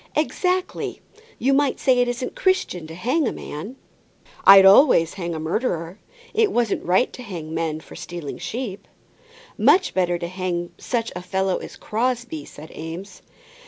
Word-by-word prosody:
"Exactly. 360 +4 -1 0.4
You 270 +3 +2
might 280 0 +2
say 255 -2 +3
it 245 - +3
isn't 245 +1 -3
Christian 375 - 0
to 160 - -9
hang 255 - 0
a - - 0
man." 195 - -7 0.7
"I'd 195 0 +10
always 195 - +6
hang 170 -3 -4
a - - -4
murderer. 170 +1 -2 0.3
It 430 -1 +3
wasn't 235 -4 0
right 185 +7 +2
to - - -9
hang 170 -9 -7
men 160 -1 -2
for - - -13
stealing 170 -5 -7
sheep." 225 -5 -5 0.7
"Much 375 0 +4
better 175 -2 +1
hang 175 0 -3
such 235 -2 -2
a 180 - -4
fellow 190 +1 0
as - - -9
Crosbie," 235 - -2
said 155 +2 -12
Eames. 165 +5 -8
195 Hz, 155 wpm, -23 LUFS, 170-250 Hz, 0.7 s, I'd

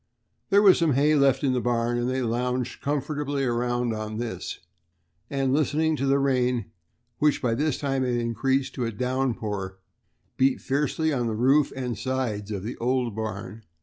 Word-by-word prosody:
There 200 +1 +5
was 195 -3 +7
some 165 -4 +3
hay 145 +4 +3
left 140 -2 +3
in 135 -2 +2
the 125 - 0
barn, 120 0 0
and 120 +1 0
they 130 0 -1
lounged 125 +1 -2
comfortably 145 0 -2
around 120 -1 0
on 110 0 -4
this, 120 0 -4
talking - - -25 0.8
and 130 -1 +2
listening 155 +2 +2
to 140 - -1
the 135 +1 +4
rain, 125 -5 +1 0.5
which 150 -1 +3
by 120 -3 0
this 150 +4 0
time 135 -2 -1
had 125 -1 0
increased 130 +3 0
to 125 - -2
a 115 - -2
downpour, 115 -5 -2
and 95 0 -40
beat 130 0 +3
fiercely 150 +3 0
on 120 -3 0
the 110 - -2
roof 135 +5 +3
and 125 -5 -3
sides 115 -4 -2
of 100 -3 -4
the 115 +4 -5
old 125 -2 0
barn. 110 -1 -5
125 Hz, 180 wpm, -26 LUFS, 115-140 Hz, 0.8 s, was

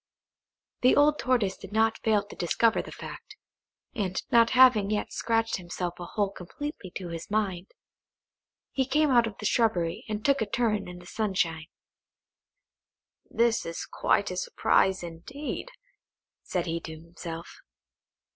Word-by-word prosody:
The 255 - +5
old 295 +1 +4
Tortoise 235 -7 +1
did 195 - -11
not 220 +1 +2
fail 215 -2 +3
to - - -12
discover 220 +6 +2
the - - -10
fact; 420 - -9 0.6
and 195 -7 -1
not 230 -1 +6
having 245 -6 +7
yet 210 -1 -2
scratched 225 0 0
himself 175 -1 -5
a 175 - -5
hole 200 +2 -1
completely 200 - -7
to 180 -3 -5
his 165 0 -6
mind, 195 -4 -1 1.0
he 265 - +1
came 300 +1 +3
out 240 -2 +5
of 215 - -8
the 210 - -7
shrubbery 200 -8 +1
and 215 0 -4
took 280 -2 +3
a 220 - 0
turn 220 -3 0
in 180 0 -8
the 175 - -13
sunshine. 175 -6 -1 1.6
"This 230 0 +2
is 165 0 -5
quite 200 - +1
a 180 - -4
surprise, 190 0 +2
indeed," 260 - -6 0.7
said 180 -2 -2
he 170 -1 -2
to 160 -1 -8
himself. 165 0 -9
205 Hz, 145 wpm, -28 LUFS, 175-230 Hz, 1.6 s, having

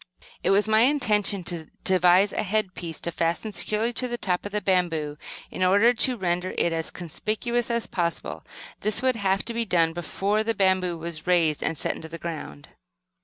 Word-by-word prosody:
It - - +1
was 200 +2 +3
my 220 0 +4
intention 210 -8 +2
to 170 -3 -4 0.2
devise 185 +2 +4
a - - 0
headpiece 185 -5 -2
to 170 - -2
fasten 170 +6 -1
securely 215 +3 -1
to 250 - 0
the 240 0 -3
top 185 -2 -1
of - - -11
the 210 - 0
bamboo 165 -6 0 0.3
in - - -6
order 205 +6 +5
to 245 +1 +2
render 180 -1 -1
it 170 - +2
as 165 -1 -1
conspicuous 220 +8 -2
as 235 -1 0
possible. 170 -2 -3 0.4
This 215 +3 0
would 260 -1 +3
have 195 -1 +1
to 235 - -4
be 230 0 0
done 165 -6 +2
before 195 +5 -1
the 225 0 -1
bamboo 185 -3 +2
was 165 0 -6
raised 165 -4 +3
and 160 - -1
set - - -1
into 160 - -9
the 165 - -7
ground. 155 - -7
190 Hz, 190 wpm, -25 LUFS, 170-215 Hz, 0.4 s, order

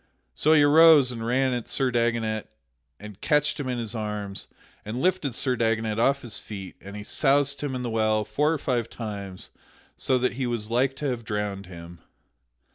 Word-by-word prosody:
So 155 - +3
he 150 -2 +6
arose 150 -3 +7
and 115 -2 -6
ran 130 +2 +1
at 120 -2 -4
Sir 130 -2 +1
Dagonet 115 -2 0 0.5
and 105 -1 -11
catched 150 -1 +1
him 135 -3 -3
in 125 - -2
his 115 -2 -3
arms, 105 -3 -4 0.4
and 110 +4 -5
lifted 175 -7 0
Sir 130 -1 0
Dagonet 110 -2 0
off 140 +4 +2
his 110 -4 -5
feet 95 -3 -8
and 100 +1 -10
he 105 - -6
soused 140 +3 +1
him 140 -3 -3
in 125 - -4
the 120 - -2
well 110 -1 +1
four 150 +8 +1
or 165 - 0
five 125 -5 -1
times 100 -5 -7 0.5
so 130 - +1
that 125 0 0
he 130 0 -2
was 115 -2 -3
like 130 +3 +1
to 150 - -6
have 125 -3 -3
drowned 105 -3 -3
him. 85 -1 -11
120 Hz, 195 wpm, -25 LUFS, 105-135 Hz, 0.5 s, arose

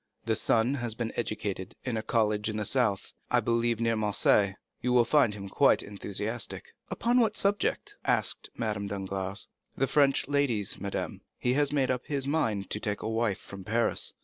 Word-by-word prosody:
"The 115 - +2
son 115 +3 +2
has 120 -5 -2
been 115 -1 -3
educated 100 -5 -3
in 125 -3 -2
a 110 - -1
college 105 -1 +1
in 110 - -3
the 105 - -1
south; 110 -5 0 0.2
I - - +4
believe 115 -1 +1
near 115 -1 +2
Marseilles. 105 -2 +3 0.3
You 125 0 +1
will 120 -1 +5
find 130 -8 +3
him 100 -1 -7
quite - - +3
enthusiastic." 105 +3 -4 0.2
"Upon 240 +2 +2
what 220 -3 +2
subject?" 200 +1 0
asked - - 0
Madame 105 -3 -2
Danglars. 95 -1 -3 0.3
"The 135 - +3
French 140 -1 +3
ladies, 135 -8 +1
madame. 100 -1 -3 0.2
He 125 - +1
has 145 +1 +2
made 135 -3 +2
up 125 -1 -3
his 140 -3 -1
mind 115 - 0
to 105 - -1
take 105 -1 -2
a - - -2
wife 110 -3 0
from 100 -1 -10
Paris." 115 +4 0
115 Hz, 180 wpm, -29 LUFS, 105-130 Hz, 0.3 s, will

